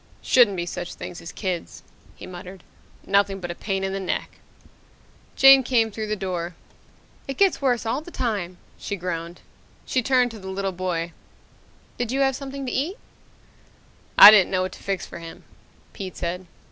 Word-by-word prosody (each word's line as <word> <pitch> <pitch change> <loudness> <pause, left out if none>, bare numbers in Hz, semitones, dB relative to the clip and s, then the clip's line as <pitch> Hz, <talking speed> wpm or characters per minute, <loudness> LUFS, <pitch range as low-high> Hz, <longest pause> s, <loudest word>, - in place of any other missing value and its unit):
"Shouldn't 230 -7 +4
be 175 - -2
such 175 0 -6
things 175 - -8
as 165 - -8
kids," 185 -4 -5 0.3
he - - -10
muttered. 185 +1 -10 0.4
"Nothing 200 0 +2
but 175 -2 -5
a - - -4
pain 195 +1 -3
in 190 0 -2
the 195 - -2
neck!" 190 - -4 1.0
Jane 270 0 +8
came 235 -3 +1
through 215 +1 -5
the 215 - -1
door. 180 -3 -4 0.7
"It 270 -1 -5
gets 390 -6 +3
worse 245 -4 +1
all 225 +6 -1
the 320 - -11
time," 205 - -3 0.2
she 205 - -4
groaned. 175 -2 -5 0.4
She 255 - 0
turned 250 -1 +2
to 225 - -10
the 190 - -10
little 195 0 -2
boy. 175 -2 -3 0.9
"Did 245 -1 -1
you 270 +1 0
have 270 -1 +2
something 275 0 -6
to 250 - -3
eat?" 320 +9 -2 1.2
"I 205 - +13
didn't 205 -4 +5
know 185 -1 0
what 185 - -3
to - - -13
fix 195 -2 -3
for - - -10
him," 165 0 -10 0.5
Pete 190 -2 -7
said. 180 +1 -4
195 Hz, 180 wpm, -24 LUFS, 180-245 Hz, 1.2 s, I